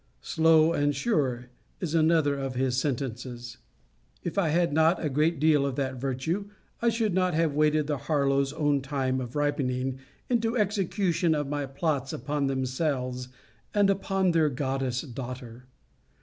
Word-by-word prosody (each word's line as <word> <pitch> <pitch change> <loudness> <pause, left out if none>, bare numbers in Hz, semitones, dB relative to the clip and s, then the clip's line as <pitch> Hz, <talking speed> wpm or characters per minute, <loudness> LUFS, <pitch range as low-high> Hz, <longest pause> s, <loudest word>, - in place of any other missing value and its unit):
Slow 160 0 +4
and 145 -2 +1
sure, 130 - -1 0.3
is 170 -4 -3
another 160 -2 +3
of 135 -2 -4
his 130 0 0
sentences. 125 -2 -3 0.7
If 175 - -4
I 195 -5 +2
had 170 0 +2
not 160 +3 +4
a 150 - -1
great 155 +3 +1
deal 150 -2 +4
of 140 -2 -1
that 135 -2 -2
virtue, 150 +10 -2 0.3
I 235 - +3
should 225 -3 0
not 185 -2 +1
have 160 -2 +2
waited 150 0 +2
the 145 -2 -2
Harlowes 140 -1 +1
own 145 -2 +1
time 130 -1 -1
of 125 +1 -7
ripening 135 -3 -1 0.3
into 230 -1 +1
execution 195 -4 +1
my 145 -1 -2
plots 140 -1 -2
upon 145 +3 -2
themselves 130 -1 -2 0.5
and 200 -1 +4
upon 195 -1 +1
their 160 -2 +3
goddess 130 -2 -2
daughter. 125 -2 -8
145 Hz, 150 wpm, -27 LUFS, 130-165 Hz, 0.7 s, Slow